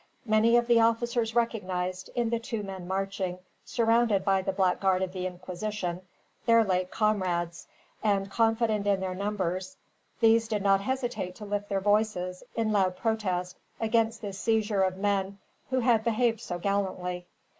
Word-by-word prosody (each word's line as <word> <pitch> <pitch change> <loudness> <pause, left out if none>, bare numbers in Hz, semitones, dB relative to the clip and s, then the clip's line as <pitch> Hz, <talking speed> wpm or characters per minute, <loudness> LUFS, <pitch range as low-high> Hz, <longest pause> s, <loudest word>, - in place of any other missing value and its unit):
Many 225 +1 +4
of 240 - +2
the 235 0 +4
soldiers 230 0 +1
recognized, 185 -6 -1
in 235 -2 0
the 235 - +1
two 225 -2 -4
men 190 -2 -7
marching, 190 -1 -2 0.3
surrounded 230 -4 +2
by 195 -1 +3
the 190 - -1
black 190 -1 +1
guard 190 -1 +2
of 185 -1 -4
the 185 -1 -2
Inquisition, 180 0 -4 0.5
their 230 0 +6
late 185 -2 0
comrades; 180 -6 -1 0.3
and, 200 -2 +1
confident 225 -2 +1
in 200 -1 +3
their 190 -1 -3
numbers, 185 -2 -3 0.4
these 225 0 +4
did 210 -3 -2
not 195 -1 +4
hesitate 245 -6 -3
to 210 - -9
lift 205 0 -3
their 195 -1 0
voices, 205 -3 +1
in 225 -1 0
loud 190 -3 +2
protest, 185 -6 -1 0.2
against 225 0 +1
this 195 -2 -5
seizure 220 -3 +1
of 185 -1 +1
men 200 -1 0 0.3
who 260 -1 +1
had 230 -2 +3
behaved 230 -1 +1
so 175 - -4
gallantly. 180 -2 -2
200 Hz, 160 wpm, -28 LUFS, 185-225 Hz, 0.5 s, their